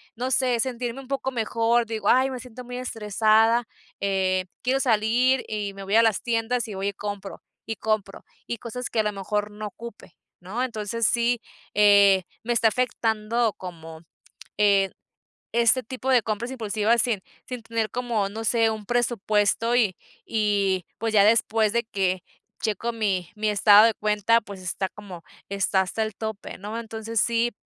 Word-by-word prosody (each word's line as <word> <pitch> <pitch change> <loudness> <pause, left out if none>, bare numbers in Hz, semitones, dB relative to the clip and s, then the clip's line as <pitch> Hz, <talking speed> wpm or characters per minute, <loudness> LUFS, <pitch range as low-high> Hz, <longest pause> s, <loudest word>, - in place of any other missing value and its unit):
no 255 +3 -3
sé, 250 -2 +2
sentirme 245 0 -3
un 260 - -14
poco 270 -1 -2
mejor, 230 0 +1
digo: 225 -1 -4
"Ay, 260 +1 +4
me 255 - -5
siento 250 0 -10
muy 245 0 -7
estresada, 225 0 +2 0.3
eh, 190 -2 0 0.2
quiero 260 +2 +1
salir" 245 +2 +2
y 205 -2 -3
me 195 0 -9
voy 200 +3 -1
a 230 - +7
las 220 -3 +2
tiendas, 235 +1 -1
y 210 - -6
voy 195 +1 -1
y - - -6
compro, 205 -1 -6 0.2
y 225 - -4
compro, 215 -3 -2 0.2
y 235 - -3
cosas 245 +2 -6
que 225 - -1
a - - +4
lo 210 - 0
mejor 205 +1 -3
no 210 +1 -7
ocupe, 230 +1 -11 0.2
¿no? 205 +8 -3
Entonces, 225 -2 -2
sí, 235 0 +1 0.3
eh, 200 -2 +6 0.2
me 240 - 0
está 230 -1 +4
afectando 225 -1 0
como, 165 -3 -9 0.6
eh, 200 -2 +4 0.6
este 235 +2 +3
tipo 260 +3 -5
de 245 -2 +5
compras 225 +4 -3
impulsivas 225 -1 +1
sin 235 -5 0 0.3
sin 250 -3 -6
tener 225 -2 -2
como, 235 -5 -1
no 220 +2 -6
sé, 225 0 +3
un 215 -2 -5
presupuesto 230 -1 +1
y 215 -7 +2 0.3
y, 200 -4 0
pues, 225 0 -2
ya 200 -2 +6
después 220 0 +3
de 235 - +1
que 190 -4 -1 0.4
checo 225 +2 -1
mi 195 -6 -1
mi 215 0 0
estado 205 +1 +7
de 225 - +3
cuenta, 210 +2 +2
pues, 200 -2 -10
está 185 +1 -3
como 190 -5 -11 0.3
está 195 -1 +1
hasta 190 +4 -2
el 215 -2 -5
tope, 220 -2 -6
¿no? 210 +4 -6
Entonces, 225 -1 -2
sí, 235 0 +1
220 Hz, 175 wpm, -25 LUFS, 205-235 Hz, 0.6 s, a